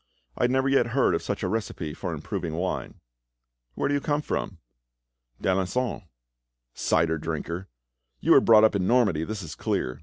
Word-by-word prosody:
I 120 Hz, -, +2 dB
never 130 Hz, +2 st, +1 dB
yet 135 Hz, -3 st, +3 dB
heard 135 Hz, -, +4 dB
of -, -, 0 dB
such -, -, -3 dB
a -, -, +1 dB
recipe 95 Hz, -6 st, -3 dB
for -, -, -5 dB
improving 80 Hz, -2 st, -4 dB
wine." 90 Hz, +2 st, -3 dB, 0.8 s
"Where -, -, 0 dB
do 145 Hz, -, 0 dB
you 145 Hz, -, +1 dB
come 150 Hz, +1 st, 0 dB
from?" 95 Hz, -, -3 dB, 0.8 s
"D'Alencon." 95 Hz, +3 st, -1 dB, 0.7 s
"Cider 80 Hz, 0 st, +1 dB
drinker! 85 Hz, +3 st, -4 dB, 0.5 s
You -, -, +1 dB
were -, -, +8 dB
brought 110 Hz, -1 st, +6 dB
up 110 Hz, -, +4 dB
in 95 Hz, -2 st, 0 dB
Normandy, 105 Hz, -11 st, +3 dB
that 105 Hz, 0 st, -5 dB
is 80 Hz, -, -7 dB
clear. 60 Hz, -, -2 dB
100 Hz, 170 wpm, -26 LUFS, 85-125 Hz, 0.8 s, were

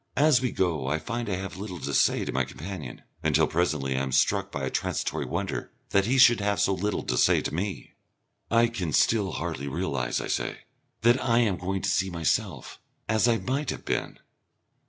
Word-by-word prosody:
As 145 Hz, -4 st, +5 dB
we 125 Hz, -, 0 dB
go 80 Hz, -8 st, 0 dB
I 75 Hz, +3 st, +1 dB
find 115 Hz, +9 st, -4 dB
I 95 Hz, -, 0 dB
have 95 Hz, 0 st, -6 dB
little 95 Hz, -3 st, -6 dB
to 70 Hz, +2 st, -3 dB
say -, -, +3 dB
to -, -, -3 dB
my 65 Hz, -, +1 dB
companion, 80 Hz, -2 st, -8 dB, 0.2 s
until -, -, +3 dB
presently 75 Hz, -6 st, 0 dB
I 65 Hz, -, 0 dB
am 70 Hz, -1 st, -2 dB
struck 65 Hz, +1 st, +2 dB
by 70 Hz, -, -4 dB
a 65 Hz, -, -2 dB
transitory -, -, -2 dB
wonder -, -, -3 dB, 0.2 s
that 100 Hz, +1 st, +3 dB
he 130 Hz, +3 st, +2 dB
should 120 Hz, -3 st, +7 dB
have 100 Hz, 0 st, 0 dB
so 100 Hz, -, +3 dB
little 100 Hz, +2 st, -2 dB
to 65 Hz, -, -1 dB
say -, -, +5 dB
to -, -, -4 dB
me. 95 Hz, +5 st, -4 dB, 0.6 s
"I 115 Hz, 0 st, +5 dB
can 95 Hz, -10 st, -3 dB
still 105 Hz, -4 st, +2 dB
hardly 80 Hz, -5 st, -4 dB
realise," 60 Hz, -3 st, -1 dB
I -, -, -4 dB
say, -, -, -2 dB, 0.4 s
"that 120 Hz, +3 st, +4 dB
I 120 Hz, -2 st, +2 dB
am 105 Hz, -5 st, +2 dB
going 95 Hz, +2 st, -3 dB
to -, -, +1 dB
see 95 Hz, +1 st, +1 dB
myself 85 Hz, -5 st, -2 dB, 0.3 s
as 110 Hz, +2 st, +2 dB
I 115 Hz, -1 st, +3 dB
might 135 Hz, +4 st, -2 dB
have -, -, -5 dB
been." -, -, -2 dB
95 Hz, 205 wpm, -27 LUFS, 75-115 Hz, 0.6 s, should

